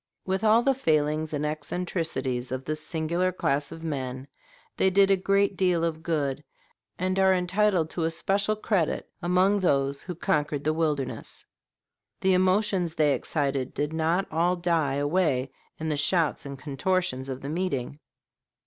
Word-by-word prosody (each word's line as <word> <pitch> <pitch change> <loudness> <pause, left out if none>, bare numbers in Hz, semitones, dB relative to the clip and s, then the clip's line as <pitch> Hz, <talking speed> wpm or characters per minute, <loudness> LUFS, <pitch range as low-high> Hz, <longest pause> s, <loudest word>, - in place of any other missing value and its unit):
With 190 +2 -1
all 220 +2 +5
the 275 - +3
failings 155 - +1
and 150 -1 -2
eccentricities 150 -5 -3
of 130 0 -4
this 155 0 -3
singular 170 +3 -1
class 145 -5 -1
of 160 - -9
men, 130 -4 -4 0.5
they 190 - +3
did 195 +1 +4
a - - +6
great 195 +1 +1
deal 180 -3 +2
of 160 -1 -1
good, 150 -4 -1 0.5
and 185 +1 0
are 190 0 +5
entitled 180 -2 +1
to 165 - -1
especial 195 +6 0
credit 205 -6 0
among 185 +3 +3
those 140 -6 +1
who 180 - -6
conquered 150 -2 0
the 155 - +1
wilderness. 150 -5 -2 0.8
The 190 0 +3
emotions 185 -2 +2
they 150 -2 +3
excited 140 -3 -2
did 150 +1 -1
not 165 +4 +1
all 170 +3 +2
die 165 -6 0
away 145 -3 +1 0.3
in 160 - -3
the 150 - +1
shouts 155 -1 +1
and 140 0 -7
contortions 140 -1 -1
of 130 0 -5
the 140 - -5
meeting. 150 -5 -2
160 Hz, 155 wpm, -27 LUFS, 145-185 Hz, 0.8 s, a